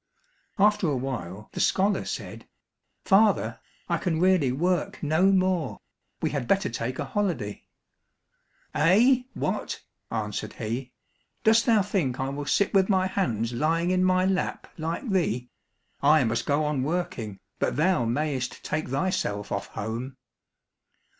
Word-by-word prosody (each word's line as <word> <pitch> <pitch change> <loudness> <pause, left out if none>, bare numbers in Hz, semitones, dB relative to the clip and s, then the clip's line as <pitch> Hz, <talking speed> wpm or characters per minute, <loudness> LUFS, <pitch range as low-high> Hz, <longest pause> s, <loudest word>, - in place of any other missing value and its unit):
After 210 -2 +3
a 145 -3 +1
while 110 -6 -5
the - - -6
scholar 195 +1 +2
said, - - -6 0.6
"Father, 195 - +3 0.3
I 170 -2 0
can 165 -2 -1
really 180 -7 +3
work 175 +6 -1
no 160 +5 +3
more, 185 -6 +1 0.4
we - - +1
had 140 -4 -2
better 195 0 +2
take 120 +2 -3
a 145 - -2
holiday." 135 - -2 1.1
"Eh, 235 - +4
what!" - - -3 0.3
answered 105 -2 -3
he, 120 +4 -4 0.5
"Dost 225 +1 +4
thou 220 -4 +5
think 170 -11 -1
I 135 0 -1
will 145 +1 -5
sit 200 +7 +2
with 195 0 +4
my 190 -2 +3
hands 120 - -1
lying 165 +7 +1
in 185 0 +2
my 185 0 +3
lap 190 -1 -1
like 165 - -4
thee? 140 - 0 0.5
I 150 0 +5
must 115 0 -1
go 150 +1 +2
on 150 -3 0
working, 130 - -3 0.2
but - - 0
thou 155 -4 +2
mayst 130 +1 -2
take 155 +1 -2
thyself 125 - -1
off 100 - -2
home." 120 +5 -5
155 Hz, 140 wpm, -26 LUFS, 125-185 Hz, 1.1 s, thou